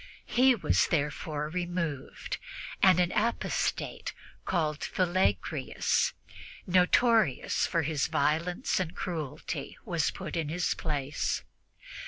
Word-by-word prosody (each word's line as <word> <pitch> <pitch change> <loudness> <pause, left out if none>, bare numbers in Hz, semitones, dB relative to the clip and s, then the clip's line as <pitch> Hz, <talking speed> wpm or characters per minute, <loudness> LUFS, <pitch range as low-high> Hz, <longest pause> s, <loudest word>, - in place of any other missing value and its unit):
He 255 +1 +4
was 210 - +2
therefore 150 -1 -1
removed, 170 -4 -3 0.4
and 185 -2 +6
an 180 0 +2
apostate 230 +2 -1 0.3
called 155 -4 0
Philagrius, 180 - +1 0.5
notorious 185 - +3
for 165 -2 +1
his 150 -2 0
violence 170 - +1
and 180 -2 -3
cruelty, 160 -7 -4
was - - +1
put - - -6
in 160 -3 -1
his 175 +3 0
place. 145 -2 -2
170 Hz, 100 wpm, -29 LUFS, 150-185 Hz, 0.5 s, and